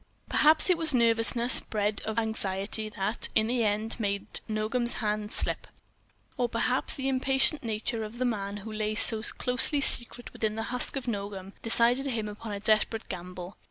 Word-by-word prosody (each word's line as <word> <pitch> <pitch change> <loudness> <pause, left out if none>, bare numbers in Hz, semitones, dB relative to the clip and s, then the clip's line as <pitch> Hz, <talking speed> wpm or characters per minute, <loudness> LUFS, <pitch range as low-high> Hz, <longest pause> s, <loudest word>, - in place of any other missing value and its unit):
Perhaps 310 +4 +5
it 345 - +1
was 320 -4 +6
nervousness 235 +1 +3
bred 210 -1 -3
of 220 - -4
this 230 - +1
anxiety 215 0 -2
that, 210 +1 -4
in 220 - +3
the 240 +1 -1
end, 215 +2 -1
made 200 -1 -3
Nogam's 220 +3 -1
hand 210 -1 -3
slip. - - -2 0.7
Or 245 -1 -1
perhaps 250 +3 +1
the 265 -1 -4
impatient 270 +3 +1
nature 225 0 -4
of 215 +2 -9
the 255 - -1
man 205 -4 -3
who 220 - -7
lay 215 0 -3
so 220 +1 +5
closely 250 +5 +1
secret 245 -2 +3
within 215 -1 -3
the 225 - -4
husk 250 - -1
of 265 -2 -5
Nogam 200 -3 -5
decided 240 +4 +1
him 225 -5 -3
upon 210 +1 -8
a 200 - -5
desperate 215 +1 0
gamble. 180 0 -8
220 Hz, 175 wpm, -27 LUFS, 210-245 Hz, 0.7 s, was